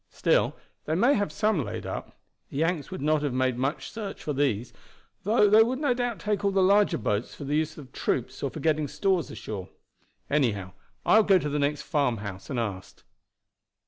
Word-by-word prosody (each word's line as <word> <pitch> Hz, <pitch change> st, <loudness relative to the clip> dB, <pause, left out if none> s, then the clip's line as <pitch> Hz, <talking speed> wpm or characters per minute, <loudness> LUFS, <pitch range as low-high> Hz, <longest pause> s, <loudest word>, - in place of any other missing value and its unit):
Still -, -, +2 dB, 0.3 s
they 155 Hz, -, 0 dB
may 240 Hz, +10 st, +4 dB
have 205 Hz, -5 st, 0 dB
some 210 Hz, -8 st, +1 dB
laid 105 Hz, -, -5 dB
up. -, -, -6 dB, 0.3 s
The -, -, -7 dB
Yanks 165 Hz, -1 st, 0 dB
would -, -, -6 dB
not 155 Hz, 0 st, +2 dB
have 145 Hz, -4 st, -1 dB
made 130 Hz, -1 st, +1 dB
much 135 Hz, +5 st, -2 dB
search 215 Hz, -3 st, -6 dB
for 150 Hz, -, -2 dB
those, 130 Hz, -5 st, 0 dB, 0.5 s
though 210 Hz, +1 st, +4 dB
they 215 Hz, +2 st, +7 dB
would 245 Hz, +3 st, +2 dB
no 285 Hz, -3 st, +2 dB
doubt 245 Hz, -2 st, -2 dB
take 210 Hz, -1 st, -2 dB
all 200 Hz, -, +3 dB
the 195 Hz, -1 st, +2 dB
larger 200 Hz, +2 st, +4 dB
boats 105 Hz, 0 st, -2 dB
for -, -, -8 dB
the 145 Hz, +2 st, -1 dB
use 155 Hz, 0 st, -1 dB
of 150 Hz, -, -9 dB
the -, -, -11 dB
troops -, -, -1 dB
or -, -, -1 dB
for -, -, -8 dB
getting 155 Hz, -2 st, +1 dB
stores 185 Hz, -1 st, 0 dB
ashore. 95 Hz, -4 st, -6 dB, 0.6 s
Anyhow, 105 Hz, -10 st, 0 dB, 0.3 s
I -, -, +6 dB
will 220 Hz, -, +6 dB
go 195 Hz, -2 st, +6 dB
to 150 Hz, -4 st, -2 dB
the 145 Hz, +1 st, -1 dB
next 145 Hz, 0 st, 0 dB
farmhouse 105 Hz, -10 st, -2 dB
and 130 Hz, -, -3 dB
ask." 100 Hz, -5 st, -5 dB
150 Hz, 210 wpm, -27 LUFS, 130-200 Hz, 0.6 s, they